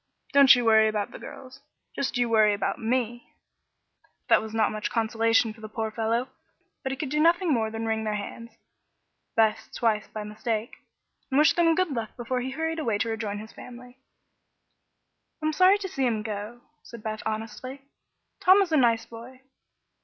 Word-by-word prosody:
Don't 275 Hz, -2 st, +8 dB
you 245 Hz, -1 st, -1 dB
worry 220 Hz, -1 st, +5 dB
about 210 Hz, -2 st, -2 dB
the -, -, -10 dB
girls; 260 Hz, +1 st, -11 dB, 0.3 s
just 270 Hz, -2 st, -2 dB
you 245 Hz, -1 st, +2 dB
worry 215 Hz, -2 st, +4 dB
about 200 Hz, -, -2 dB
me." 240 Hz, 0 st, -2 dB, 0.9 s
That -, -, +5 dB
was 220 Hz, 0 st, -7 dB
not 225 Hz, 0 st, +1 dB
much 215 Hz, 0 st, -3 dB
consolation 225 Hz, 0 st, +1 dB
for 220 Hz, -, -18 dB
the 215 Hz, -, -8 dB
poor 220 Hz, 0 st, -3 dB
fellow, 230 Hz, +3 st, -1 dB, 0.5 s
but 265 Hz, -, -3 dB
he -, -, -2 dB
could 285 Hz, 0 st, -4 dB
do 300 Hz, -, 0 dB
nothing 335 Hz, +1 st, +3 dB
more 220 Hz, -3 st, 0 dB
than 225 Hz, +1 st, -5 dB
wring 220 Hz, 0 st, -1 dB
their 215 Hz, -1 st, -2 dB
hands 230 Hz, +3 st, -7 dB, 0.9 s
Beth's 220 Hz, -1 st, +2 dB
twice, 220 Hz, -3 st, 0 dB
by 215 Hz, -, -6 dB
mistake 215 Hz, +2 st, -3 dB, 0.6 s
and 265 Hz, -, 0 dB
wish 300 Hz, +2 st, +5 dB
them 330 Hz, -1 st, +3 dB
good 370 Hz, -2 st, 0 dB
luck 230 Hz, -5 st, -5 dB
before 250 Hz, +1 st, -2 dB
he 255 Hz, -, -3 dB
hurried 320 Hz, +4 st, -3 dB
away 230 Hz, -9 st, 0 dB
to 225 Hz, -, -1 dB
rejoin 215 Hz, -2 st, -3 dB
his 215 Hz, +1 st, -9 dB
family. 250 Hz, +1 st, -12 dB, 1.4 s
"I'm 310 Hz, 0 st, -1 dB
sorry 370 Hz, +5 st, +5 dB
to 405 Hz, -2 st, -5 dB
see 270 Hz, -7 st, -1 dB
him 220 Hz, -3 st, -1 dB
go," 215 Hz, +2 st, -6 dB, 0.2 s
said 235 Hz, -3 st, -12 dB
Beth, 215 Hz, -1 st, -4 dB
honestly. 225 Hz, +5 st, -6 dB, 0.6 s
"Tom 375 Hz, +2 st, +6 dB
is 355 Hz, -, -7 dB
a 310 Hz, -, +4 dB
nice 230 Hz, -4 st, +3 dB
boy." 240 Hz, +3 st, -12 dB
230 Hz, 185 wpm, -26 LUFS, 220-265 Hz, 1.4 s, Don't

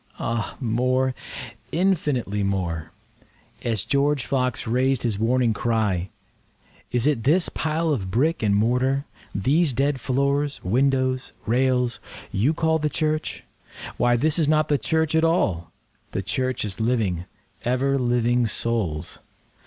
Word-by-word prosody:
Ah 115 Hz, -2 st, -3 dB
more—infinitely 130 Hz, -, -1 dB
more;(As 95 Hz, +3 st, -5 dB
George 140 Hz, -1 st, +1 dB
Fox 130 Hz, -3 st, -1 dB
rais'd 130 Hz, +2 st, +1 dB
his 110 Hz, -5 st, -1 dB
warning 120 Hz, +1 st, +2 dB
cry, 105 Hz, -5 st, 0 dB, 0.8 s
"Is 120 Hz, 0 st, +1 dB
it 145 Hz, -6 st, +2 dB
this 165 Hz, +9 st, +3 dB
pile 160 Hz, +1 st, -1 dB
of 95 Hz, -9 st, -3 dB
brick 145 Hz, -, +1 dB
and 105 Hz, -2 st, +2 dB
mortar—these 130 Hz, -, 0 dB
dead 135 Hz, +1 st, 0 dB
floors, 140 Hz, +3 st, 0 dB
windows, 130 Hz, +4 st, +1 dB
rails—you 125 Hz, -1 st, 0 dB
call 160 Hz, 0 st, +2 dB
the 150 Hz, 0 st, 0 dB
church? 155 Hz, +1 st, -1 dB, 0.5 s
Why 120 Hz, 0 st, +3 dB
this 155 Hz, +7 st, +2 dB
is 155 Hz, -, +2 dB
not 155 Hz, 0 st, +2 dB
the 145 Hz, -2 st, +2 dB
church 160 Hz, -1 st, 0 dB
at 160 Hz, 0 st, +3 dB
all—the 95 Hz, -, -2 dB
Church 130 Hz, +4 st, -1 dB
is 100 Hz, -1 st, -3 dB
living, 110 Hz, -7 st, 0 dB, 0.4 s
ever 135 Hz, +3 st, +1 dB
living 120 Hz, -1 st, +2 dB
Souls.") 100 Hz, -9 st, -1 dB
125 Hz, 115 wpm, -24 LUFS, 110-145 Hz, 0.8 s, this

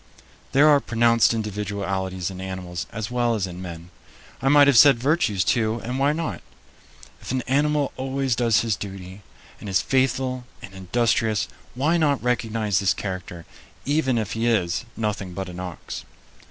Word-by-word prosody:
There 145 Hz, +3 st, +6 dB
are 145 Hz, -2 st, +6 dB
pronounced 115 Hz, -2 st, +3 dB
individualities 100 Hz, -4 st, -3 dB
in 95 Hz, 0 st, -8 dB
animals 90 Hz, -2 st, -5 dB
as 110 Hz, +2 st, -5 dB
well 120 Hz, -1 st, +1 dB
as 100 Hz, -4 st, -1 dB
in 90 Hz, -1 st, -8 dB
men. 85 Hz, -1 st, -8 dB, 0.5 s
I 135 Hz, -, +2 dB
might 145 Hz, 0 st, +7 dB
have 140 Hz, -2 st, +4 dB
said 140 Hz, -2 st, +7 dB
virtues, 120 Hz, -, +1 dB
too 110 Hz, -1 st, +1 dB
and 125 Hz, +3 st, -3 dB
why 140 Hz, +2 st, +3 dB
not? 150 Hz, -, -3 dB, 0.8 s
If -, -, -10 dB
an 130 Hz, -1 st, -1 dB
animal 145 Hz, +2 st, +1 dB
always 135 Hz, -1 st, -1 dB
does 115 Hz, -2 st, +3 dB
his 115 Hz, -3 st, 0 dB
duty 95 Hz, -1 st, -8 dB, 0.4 s
and 105 Hz, -, -7 dB
is 95 Hz, -1 st, +3 dB
faithful 130 Hz, -1 st, 0 dB
and 95 Hz, -, -11 dB
industrious, 110 Hz, +3 st, 0 dB, 0.3 s
why 150 Hz, +7 st, +2 dB
not 145 Hz, -5 st, +1 dB
recognize 115 Hz, -5 st, 0 dB
this 95 Hz, -4 st, +2 dB
character, 90 Hz, -3 st, -6 dB, 0.4 s
even 140 Hz, -3 st, +1 dB
if 110 Hz, -2 st, -2 dB
he 115 Hz, +1 st, -1 dB
is 100 Hz, -3 st, +1 dB
"nothing 105 Hz, -4 st, -3 dB
but 95 Hz, 0 st, -4 dB
an 90 Hz, 0 st, -8 dB
ox"? 90 Hz, -2 st, -7 dB
115 Hz, 165 wpm, -23 LUFS, 95-130 Hz, 0.8 s, might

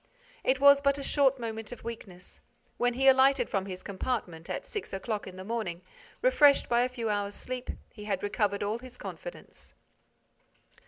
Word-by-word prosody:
It 260 Hz, 0 st, +2 dB
was 280 Hz, 0 st, +7 dB
but 280 Hz, 0 st, +2 dB
a 280 Hz, -, -5 dB
short 275 Hz, -1 st, +3 dB
moment 225 Hz, -2 st, -5 dB
of 245 Hz, -, -9 dB
weakness. 195 Hz, -6 st, -9 dB, 0.4 s
When 245 Hz, 0 st, +1 dB
he 270 Hz, +2 st, +2 dB
alighted 265 Hz, -1 st, +5 dB
from 195 Hz, 0 st, -1 dB
his 185 Hz, -1 st, -7 dB
compartment, 190 Hz, -5 st, -4 dB
at -, -, -4 dB
six 420 Hz, -, -6 dB
o'clock 210 Hz, +2 st, -3 dB
in 185 Hz, -, -9 dB
the 185 Hz, -, -8 dB
morning, 190 Hz, -5 st, -3 dB, 0.4 s
refreshed 295 Hz, -, +5 dB
by 240 Hz, 0 st, +3 dB
a 250 Hz, -, +1 dB
few 235 Hz, -4 st, -2 dB
hours' 205 Hz, 0 st, -2 dB
sleep, 255 Hz, 0 st, -5 dB, 0.2 s
he 210 Hz, -2 st, -10 dB
had 200 Hz, -2 st, -2 dB
recovered 205 Hz, -1 st, 0 dB
all 210 Hz, +3 st, -1 dB
his 255 Hz, 0 st, -11 dB
confidence. -, -, -9 dB
235 Hz, 175 wpm, -29 LUFS, 200-265 Hz, 0.4 s, was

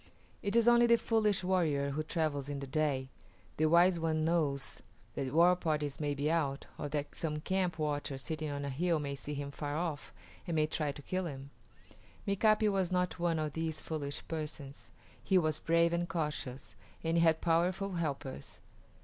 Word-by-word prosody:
It 200 Hz, +2 st, -1 dB
is 235 Hz, 0 st, +4 dB
only 240 Hz, 0 st, +6 dB
the 235 Hz, 0 st, +6 dB
foolish 215 Hz, -5 st, +1 dB
warrior 155 Hz, -7 st, +1 dB
who 150 Hz, +3 st, -1 dB
travels 155 Hz, -3 st, -1 dB
in 145 Hz, -1 st, -3 dB
the 140 Hz, -, -5 dB
day. 135 Hz, -2 st, 0 dB, 0.5 s
The 155 Hz, -, +3 dB
wise 170 Hz, +2 st, +5 dB
one 160 Hz, -1 st, 0 dB
knows 150 Hz, -5 st, 0 dB, 0.3 s
that 130 Hz, -1 st, -3 dB
war 175 Hz, +3 st, +6 dB
parties 150 Hz, -5 st, -2 dB
may 145 Hz, -2 st, -1 dB
be 145 Hz, +3 st, 0 dB
out, 145 Hz, -4 st, 0 dB
or 145 Hz, -, -3 dB
that 145 Hz, 0 st, -3 dB
some 150 Hz, -2 st, -2 dB
camp 185 Hz, -2 st, 0 dB
watcher 145 Hz, -3 st, -2 dB
sitting 155 Hz, +2 st, -4 dB
on 140 Hz, 0 st, -3 dB
a 140 Hz, -, -3 dB
hill 165 Hz, +5 st, +1 dB
may 145 Hz, -2 st, -3 dB
see 145 Hz, +2 st, -5 dB
him 140 Hz, 0 st, -4 dB
far 145 Hz, +1 st, -3 dB
off 160 Hz, -3 st, -3 dB, 0.4 s
and 170 Hz, -, -1 dB
may 155 Hz, -1 st, +3 dB
try 155 Hz, -1 st, -1 dB
to 145 Hz, 0 st, -11 dB
kill 185 Hz, +2 st, -2 dB
him. 140 Hz, -2 st, -8 dB, 0.8 s
Mika´pi 215 Hz, +1 st, +3 dB
was 190 Hz, -3 st, 0 dB
not 180 Hz, 0 st, 0 dB
one 170 Hz, -1 st, +1 dB
of 155 Hz, -2 st, -2 dB
these 160 Hz, -1 st, -2 dB
foolish 145 Hz, -3 st, -4 dB
persons. 150 Hz, -3 st, -6 dB, 0.3 s
He 190 Hz, -, +3 dB
was 155 Hz, -3 st, +2 dB
brave 170 Hz, 0 st, +3 dB
and 175 Hz, +1 st, -1 dB
cautious, 150 Hz, -6 st, -3 dB, 0.3 s
and 165 Hz, +1 st, +1 dB
he -, -, +4 dB
had 160 Hz, -1 st, +4 dB
powerful 180 Hz, +4 st, +1 dB
helpers. 140 Hz, -, -4 dB
155 Hz, 185 wpm, -33 LUFS, 145-175 Hz, 0.8 s, only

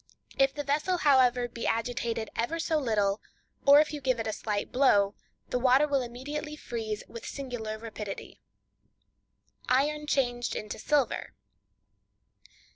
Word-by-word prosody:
If 270 Hz, 0 st, +3 dB
the 290 Hz, -, -3 dB
vessel, 300 Hz, +6 st, +1 dB
however, 255 Hz, -5 st, +4 dB
be 235 Hz, -1 st, -5 dB
agitated 230 Hz, -1 st, -1 dB
ever 240 Hz, +9 st, -1 dB
so 320 Hz, -1 st, 0 dB
little, 210 Hz, -6 st, +1 dB, 0.5 s
or 285 Hz, +1 st, +9 dB
if 305 Hz, -, -2 dB
you 295 Hz, -, -5 dB
give 255 Hz, -3 st, +1 dB
it 225 Hz, -, -2 dB
a 220 Hz, -, -2 dB
slight 205 Hz, -1 st, -3 dB
blow, 205 Hz, -7 st, +4 dB, 0.4 s
the 250 Hz, -, 0 dB
water 260 Hz, +4 st, +5 dB
will 280 Hz, -2 st, +1 dB
immediately 290 Hz, +5 st, -5 dB
freeze 220 Hz, -7 st, -4 dB
with 230 Hz, -, -9 dB
singular 245 Hz, -6 st, -5 dB
rapidity. 215 Hz, -3 st, -7 dB, 1.3 s
Iron 295 Hz, +4 st, +2 dB
Changed 245 Hz, -4 st, 0 dB
into 210 Hz, 0 st, -5 dB
Silver. 290 Hz, +1 st, 0 dB
250 Hz, 135 wpm, -29 LUFS, 225-285 Hz, 1.3 s, or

